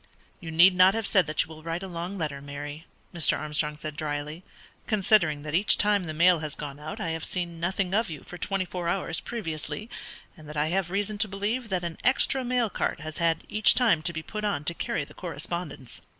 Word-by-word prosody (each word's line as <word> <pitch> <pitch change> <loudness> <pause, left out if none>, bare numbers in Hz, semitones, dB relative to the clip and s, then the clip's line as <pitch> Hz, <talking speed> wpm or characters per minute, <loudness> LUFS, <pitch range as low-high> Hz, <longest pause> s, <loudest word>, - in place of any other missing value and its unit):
"You 170 - -8
need 170 +4 +7
not 185 +3 +6
have 225 -1 -1
said 190 -6 +3
that 155 - +2
you - - -14
will 155 -1 -10
write 165 +3 -4
a - - -5
long 175 +2 -5
letter, 150 -5 -3
Mary," 145 +3 -7 0.3
Mr. 165 -5 +5
Armstrong 150 0 -2
said, 150 -1 -6
drily, 150 +2 -4 0.5
"considering 190 -8 +3
that 150 -1 -6
each 190 +5 +5
time 205 -3 +2
the 155 - -4
mail 175 +1 +5
has 155 -2 -3
gone 145 -1 -7
out 155 +1 -7
I 165 - -2
have 165 0 -3
seen 175 -2 -3
nothing 185 +2 -1
of 220 -1 +2
you 155 -4 -7
for 180 - -10
twenty 195 -2 -1
four 180 -1 -4
hours 170 -2 -1
previously, 210 0 -5 0.4
and 155 -4 -13
that 150 - -7
I 150 +1 +1
have 185 0 0
reason 205 +2 -2
to 215 - +4
believe 215 +5 -2
that 185 -2 -1
an 170 -1 -5
extra 265 +1 +3
mail 245 -1 +1
cart - - -2
has 155 0 -7
had 165 -1 +1
each 215 0 +4
time 225 -11 +4
to 170 - 0
be 160 -1 -5
put 215 +4 -6
on 200 -8 -1
to 170 - 0
carry 155 - -2
the - - -13
correspondence." 170 -7 -5
170 Hz, 225 wpm, -27 LUFS, 155-195 Hz, 0.5 s, need